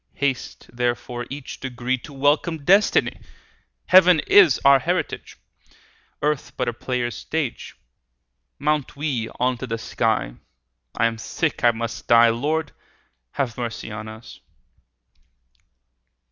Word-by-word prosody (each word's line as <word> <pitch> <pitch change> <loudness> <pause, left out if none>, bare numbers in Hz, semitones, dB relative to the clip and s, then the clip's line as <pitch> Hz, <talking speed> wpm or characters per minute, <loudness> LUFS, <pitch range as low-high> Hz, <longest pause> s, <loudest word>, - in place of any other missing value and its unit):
35 - - -29
Haste 140 -3 -3
therefore 120 0 -2
each 140 0 -8
degree 125 -1 -2
To 150 - -12
welcome 145 +3 0
destiny; 195 +3 +3 0.7
Heaven 180 -2 +6
is 190 -8 +5
our 140 0 +7
heritage, - - -3 0.9
Earth 150 -1 -1
but 125 - -1
a 120 - -1
player's 120 0 -3
stage. 155 -6 -4 0.8
Mount 150 -1 -1
we 140 -6 -2
unto 125 0 -1
the 115 -1 -3
sky; 115 - -1 0.7
40 - - -16
I 115 - +3
am 115 0 0
sick, - - -2
I 120 - +7
must 115 +1 -4
die— 115 0 +6
Lord, 145 +7 -1 0.6
have 125 -3 -2
mercy 115 -2 -5
on 110 +1 -7
us! 110 +1 -11
125 Hz, 125 wpm, -22 LUFS, 120-145 Hz, 0.9 s, our